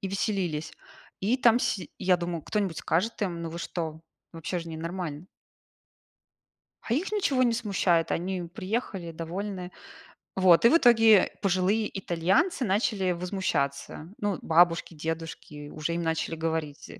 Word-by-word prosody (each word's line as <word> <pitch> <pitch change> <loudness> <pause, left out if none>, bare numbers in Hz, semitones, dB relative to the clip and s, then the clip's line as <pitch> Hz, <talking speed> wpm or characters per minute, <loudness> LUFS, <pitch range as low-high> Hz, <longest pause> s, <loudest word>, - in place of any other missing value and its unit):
и 195 - -3
веселились. 190 -6 -2 0.5
И 220 +7 +2
там 240 -1 +4
си 190 - -2
я 180 -1 +4
думаю, 170 -2 -4
кто-нибудь 195 -7 -2
скажет 210 +6 -1
им: 170 -3 -2
"Ну, 165 - -4
вы 170 - -6
что?" 160 -3 -4 0.3
Вообще 165 +2 -4
же 165 0 -7
не 160 - -6
нормально. 165 -1 -5 1.6
А 230 - -1
их 370 +9 -2
ничего 280 -11 +2
не 240 -2 +3
смущает, 195 -7 +1
они 185 +1 -2
приехали 185 0 -4
довольны. 180 +3 -5 0.6
Вот, 185 +1 +5
и - - +9
в 330 - +6
итоге 225 - +6
пожилые 195 +3 +2
итальянцы 190 - +1
начали 195 -2 +1
возмущаться. 170 -4 -2
Ну, 205 -2 -2
бабушки, 170 0 +3
дедушки 160 -2 -6
уже 155 +2 -3
им 170 - -1
начали 160 0 -1
говорить, 160 -2 -3
э. - - -11
180 Hz, 145 wpm, -27 LUFS, 165-205 Hz, 1.6 s, и